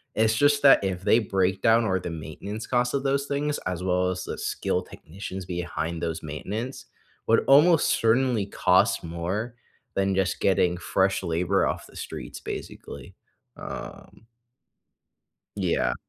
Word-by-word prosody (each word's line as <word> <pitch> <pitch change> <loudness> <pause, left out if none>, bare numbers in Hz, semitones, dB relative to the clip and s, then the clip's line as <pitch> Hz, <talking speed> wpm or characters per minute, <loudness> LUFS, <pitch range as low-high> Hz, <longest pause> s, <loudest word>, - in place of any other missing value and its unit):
it's 110 0 +3
just 145 +3 +3
that 135 -7 +7
if 95 -1 -2
they 115 - +4
break 95 -3 0
down 115 0 +4
or 95 -2 +1
the 90 - -5
maintenance 85 +8 -7
costs 125 0 +1
of 140 0 -1
those 140 0 +1
things, 145 +1 -1
as 90 -1 -3
well 90 0 +1
as 90 0 -3
the - - -5
skilled 90 0 -2
technicians 95 +2 -8
behind 85 -2 -4
those 80 +2 -3
maintenance, 105 - -5 0.4
would 115 - +3
almost 150 +4 +6
certainly 115 -2 +2
cost 100 - +2
more 90 +8 -4 0.4
than 95 0 +1
just 95 -1 0
getting 90 -2 +2
fresh 95 +1 0
labor 90 +3 +1
off - - -3
the - - -19
streets, - - -7
basically. - - -8 0.4
Um - - -9 1.3
Yeah. 85 -10 0
95 Hz, 145 wpm, -26 LUFS, 90-115 Hz, 1.3 s, that